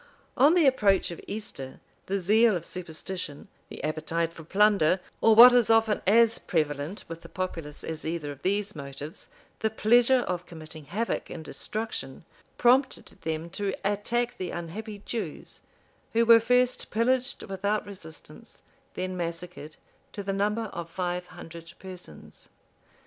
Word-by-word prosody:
On 290 +6 +5
the 345 -4 +5
approach 205 -9 +3
of 170 - -8
Easter, 140 -11 -7 0.3
the 195 +1 0
zeal 215 +4 +4
of 170 -1 -4
superstition, 175 -3 -6 0.2
the - - -9
appetite 160 +2 -1
for 165 - -11
plunder, 195 -1 +3 0.2
or 225 -1 +6
what 245 +2 +11
is 245 -3 +4
often 225 -2 +3
as 230 +2 +5
prevalent 150 +2 -2
with 165 0 -8
the 165 - -12
populace 165 -5 -5
as 160 -1 -5
either 160 -2 -3
of 140 - -11
these 200 +1 -1
motives, 140 +2 -8 0.3
the 220 - +1
pleasure 240 +4 +4
of 180 -5 -3
committing 155 -2 -10
havoc 215 +10 -2
and 160 -2 -7
destruction, 210 -11 -5 0.3
prompted 260 +2 +3
them 160 +1 -3
to 195 +1 -2
attack 235 +4 0
the 185 -2 -3
unhappy 200 +5 -6
Jews, 230 - -6 0.5
who 230 +1 +4
were 230 0 +8
first 250 +2 +2
pillaged 250 +4 0
without 200 +2 -1
resistance, 170 -6 -12 0.3
then 185 0 -3
massacred, 170 -2 -5 0.4
to 205 - -5
the 195 0 -2
number 210 +3 0
of 170 -1 -6
five 180 +1 -3
hundred 165 0 -11
persons. 180 - -12
190 Hz, 145 wpm, -27 LUFS, 165-220 Hz, 0.5 s, what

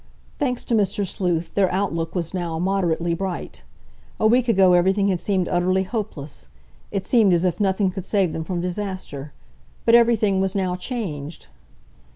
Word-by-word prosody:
Thanks 250 -4 -1
to - - -1
Mr. 205 -2 +1
Sleuth, 175 -3 -2
their 195 -2 +2
outlook 175 -3 -2
was 170 -1 -2
now 170 -3 -3
moderately 175 -2 0
bright. 185 +1 -5 0.6
A - - +1
week 245 +3 +4
ago 190 -5 +5
everything 190 +3 +3
had 185 -2 0
seemed 185 -2 0
utterly 185 +1 +1
hopeless. 155 - -5 0.4
It 195 -2 -3
seemed 220 -7 +4
as 170 0 +2
if 175 -2 0
nothing 195 -1 +1
could 190 -1 -6
save 195 -6 +1
them 160 - -3
from 175 +1 -3
disaster. 180 -6 -5 0.5
But 230 - +4
everything 225 -5 +4
was 190 0 -1
now 185 -2 0
changed! 175 - -5
185 Hz, 165 wpm, -22 LUFS, 175-200 Hz, 0.6 s, ago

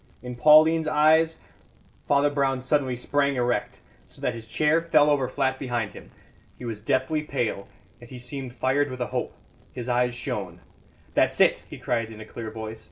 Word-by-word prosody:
In 125 0 -6
Pauline's 155 +4 +6
eyes 160 +2 +3 0.4
" - - -33
Father 145 +1 +3
Brown 135 -2 0
suddenly 130 -1 0
sprang 140 +3 0
erect, 120 -1 -1 0.3
so - - -17
that 125 - -1
his 115 -1 -9
chair 150 +8 +2
fell 155 -3 +4
over 135 -3 +1
flat 130 -1 -1
behind 120 -6 -3
him. - - -12 0.5
He 125 - -9
was 110 -3 -5
deathly 130 +7 0
pale, 120 -9 -3 0.3
yet 120 - -14
he 130 - -9
seemed 125 +1 -7
fired 140 +3 +1
with 130 -1 -7
a - - +1
hope; - - -3 0.4
his 125 -1 -6
eyes 125 0 +1
shone. 95 -8 -5 0.5
"That's - - +2
it!" - - +4
he - - -8
cried 115 -2 -2
in 110 - -11
a 110 - -9
clear 110 0 -7
voice. 110 0 -7
130 Hz, 185 wpm, -25 LUFS, 120-145 Hz, 0.5 s, Pauline's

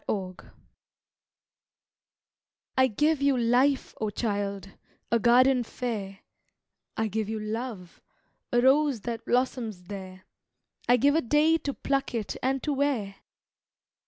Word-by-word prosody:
The 190 -3 -2
Gifts - - -16 2.3
I 260 0 +5
GIVE 295 +6 +1
you 280 -2 +3
Life, 250 +4 +2
O 215 - 0
child, 200 -2 -3 0.4
a 235 - +3
garden 250 +3 +5
fair; 210 -5 -5 0.8
I 220 - +1
give 215 0 -3
you 220 0 -3
Love, 215 -4 -6 0.5
a 240 - +3
rose 270 -2 +3
that 230 0 -5
blossoms 240 -6 -1
there 185 0 -9 0.7
I 245 - +6
give 280 +4 +3
a 325 - +3
day 300 +6 +3
to 280 - -3
pluck 275 -3 -1
it 220 -3 -3
and 265 +1 -1
to 300 - 0
wear! 260 -9 -1
235 Hz, 130 wpm, -27 LUFS, 205-270 Hz, 2.3 s, I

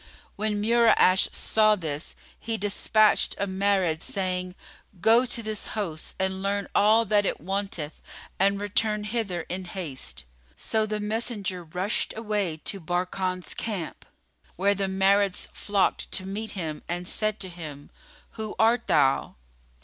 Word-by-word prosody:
When 210 0 0
Mura'ash 225 -5 +4
saw 215 -1 +3
this, 155 -5 -5 0.2
he 225 -1 -3
despatched 210 +1 +3
a 200 - 0
Marid, 190 -4 +1
saying, 185 -1 -2 0.4
"Go 230 +6 +5
to 235 -1 -2
this 215 -1 -3
host 165 -7 -4
and 190 0 -1
learn 200 0 -1
all 220 +3 +5
that 205 0 +3
it - - -1
wanteth 190 -3 -3 0.4
and 200 +1 +3
return 210 +1 0
hither 210 -5 -2
in 185 +3 -5
haste." 170 - -4 0.3
So 220 - 0
the 215 0 -2
messenger 210 -4 -1
rushed 180 +6 0
away 210 -7 -1
to 195 - -1
Barkan's 180 +1 -2
camp, 200 -8 -4 0.5
where 200 +3 +3
the 195 0 -1
Marids 195 0 +2
flocked 205 -2 0
to 185 - 0
meet 215 +3 -5
him 155 -4 -4
and 175 +1 -3
said 215 +1 0
to 190 - -2
him, 155 -5 -9 0.4
"Who 220 -1 -6
art 230 +2 +3
thou?" 135 -3 +3
195 Hz, 140 wpm, -26 LUFS, 180-215 Hz, 0.5 s, Go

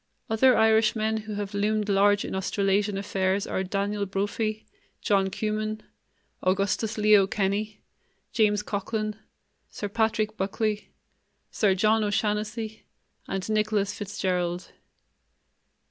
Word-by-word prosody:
Other 250 +2 +5
Irishmen 220 0 +3
who 215 -1 -5
have 205 0 -4
loomed 210 +1 0
large 205 0 +3
in - - -5
Australasian 195 +1 0
affairs 195 0 0
are 190 - -2
Daniel 200 +2 -2
Brophy, 210 +3 -2 0.3
John 195 -2 +2
Cumin, 215 +1 -3 0.6
Augustus 200 +4 0
Leo 210 -2 +5
Kenny, 205 +2 -2 0.5
James 210 -2 +2
Coghlan, 215 +1 -3 0.5
Sir 205 - -5
Patrick 220 0 0
Buckley, 210 +2 -2 0.6
Sir 200 -3 +2
John 215 +3 +3
O'Shannessy, 215 +1 -2 0.5
and 195 -1 -3
Nicholas 215 -2 +1
Fitzgerald. 185 -4 -2
210 Hz, 105 wpm, -26 LUFS, 195-215 Hz, 0.6 s, Other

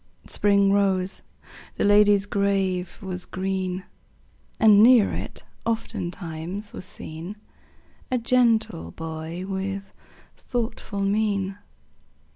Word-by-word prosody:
Spring 200 -1 +3
rose; 195 -2 +1 0.5
the - - -1
lady's 205 -1 +5
grave 195 -3 0
was 180 -1 -4
green; 185 -1 -3 0.8
And 210 -2 +7
near 235 -2 +6
it, - - -5 0.2
oftentimes, 180 -3 -4
was - - -6
seen 170 +2 -7 0.7
A 255 - +1
gentle 230 - +2
boy 160 - -6
with 195 0 -4 0.4
thoughtful 225 -4 -3
mien. 200 -1 0
195 Hz, 90 wpm, -25 LUFS, 185-210 Hz, 0.8 s, And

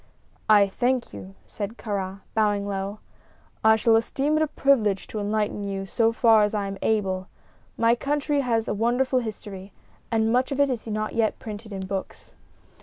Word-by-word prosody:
"I 205 -2 +7
thank 245 - -1
you," 95 -1 -10
said 215 +3 -6
Kāra, 195 -2 -4
bowing 205 -2 +1
low; 200 +1 -3 0.7
"I 220 0 +6
shall 225 +1 +3
esteem 275 +6 +1
it 310 - +2
a 315 - +2
privilege 230 -9 +2
to 215 - -6
enlighten 210 0 -1
you 195 -1 -3
so 225 +3 +2
far 225 -1 +5
as 210 +1 +1
I 205 -1 -1
am 195 0 -5
able. 190 -4 0 0.5
My 230 0 +4
country 290 +3 0
has 230 -4 0
a - - 0
wonderful 245 +4 +1
history, 205 -4 -7 0.4
and 225 0 +1
much 255 +2 +1
of 275 - -2
it 280 -1 +3
is 235 -2 -4
not 215 0 -2
yet 225 -1 +1
printed 215 0 -8
in 190 -1 -5
books." 190 0 -6
215 Hz, 180 wpm, -25 LUFS, 200-235 Hz, 0.7 s, I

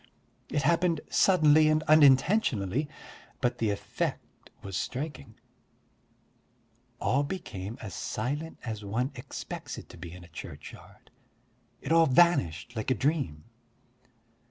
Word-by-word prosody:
It 145 - -1
happened 170 +1 +2
suddenly 155 -4 +5
and 155 0 +2
unintentionally, 145 - +4 0.5
but 120 - 0
the 110 - +1
effect 100 - -4
was 95 -2 -6
striking: 135 - -4 1.6
all 140 - +2
became 115 - -5
as 95 -5 -6
silent 145 - -3
as 110 -3 -5
one 120 +7 -1
expects 125 -1 -7
it - - -10
to - - -12
be 85 - -8
in 90 +1 -11
a - - -13
churchyard, 80 - -11 0.7
it 140 - -5
all 165 0 +6
vanished 125 - +3
like 110 +2 -3
a 130 - +3
dream. 130 - -1
135 Hz, 120 wpm, -29 LUFS, 105-155 Hz, 1.6 s, all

